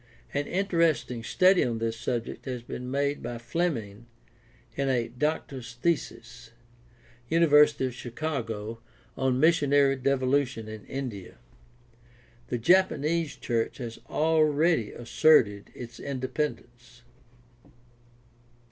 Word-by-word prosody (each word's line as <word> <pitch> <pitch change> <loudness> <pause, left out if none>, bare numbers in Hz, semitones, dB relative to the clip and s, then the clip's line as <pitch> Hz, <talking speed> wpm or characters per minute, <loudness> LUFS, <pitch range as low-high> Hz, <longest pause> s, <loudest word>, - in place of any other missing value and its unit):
An 145 0 -1
interesting 165 - 0
study 185 +7 +4
on 120 -2 -1
this 115 0 -2
subject 120 0 -4
has 125 -3 -5
been 125 +1 -6
made 140 +2 -1
by 120 - -5
Fleming 120 - -3 0.7
in 140 -1 0
a 120 -3 0
Doctor's 130 -2 -3
thesis 125 -4 -3 0.8
(University 150 -4 +5
of 130 - -3
Chicago) 115 -4 -4 0.4
on 130 -1 0
Missionary 145 -3 +4
Devolution 130 -3 0
in 110 -1 -9
India. 125 -9 -6 1.1
The 120 - -2
Japanese 165 +2 +2
church 115 -2 -2
has 120 -3 -7
already 155 -4 +2
asserted 115 -5 +3
its 120 -1 -9
independence. 125 -3 -5
130 Hz, 100 wpm, -27 LUFS, 120-150 Hz, 1.1 s, University